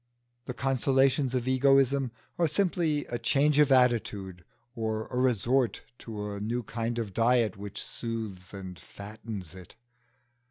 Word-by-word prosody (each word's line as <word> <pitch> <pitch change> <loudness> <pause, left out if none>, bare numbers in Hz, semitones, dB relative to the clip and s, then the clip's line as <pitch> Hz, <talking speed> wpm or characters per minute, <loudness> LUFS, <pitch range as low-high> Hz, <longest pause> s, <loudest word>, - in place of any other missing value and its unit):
The 125 - -5
consolations 135 0 +2
of 125 0 -1
egoism 135 0 +3 0.3
are 170 - +4
simply 165 -4 +1
a 120 - -4
change 140 +5 +3
of 145 -2 +5
attitude 105 -8 +2 0.3
or 110 -2 -2
a 125 - -4
resort 125 0 +1 0.2
to 105 -2 -6
a 100 - -5
new 115 +4 -2
kind 115 +2 -3
of 110 -5 -3
diet 115 -2 +3
which 100 0 -7
soothes 110 -6 -6
and 95 -4 -8
fattens 100 -2 -8
it. 95 -1 -13
120 Hz, 135 wpm, -29 LUFS, 105-135 Hz, 0.3 s, of